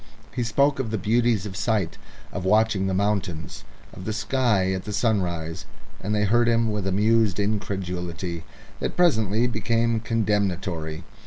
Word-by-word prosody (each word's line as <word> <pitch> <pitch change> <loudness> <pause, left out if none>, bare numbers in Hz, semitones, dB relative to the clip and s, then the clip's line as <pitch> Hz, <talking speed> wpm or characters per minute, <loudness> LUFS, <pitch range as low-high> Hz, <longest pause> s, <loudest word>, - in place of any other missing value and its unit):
He 125 - -2
spoke 140 +4 +2
of 125 -4 -1
the 110 - -1
beauties 115 0 +2
of 95 -2 -6
sight, 100 -2 -1 0.3
of 100 - -3
watching 105 0 +3
the 95 - 0
mountains, 95 -5 -2 0.3
of 90 - -9
the 110 - -2
sky 110 -2 +1
and 95 - -2
the 105 - -6
sunrise, 90 -7 -1 0.3
and 105 +2 -1
they 105 - +2
heard 120 +3 +3
him 115 -1 +2
with 105 -2 -2
amused 105 +1 +2
incredulity 90 -4 -3 0.4
that - - -3
presently 110 - +3
became 115 0 +1
condemnatory. 95 -8 -1
105 Hz, 150 wpm, -25 LUFS, 95-115 Hz, 0.4 s, watching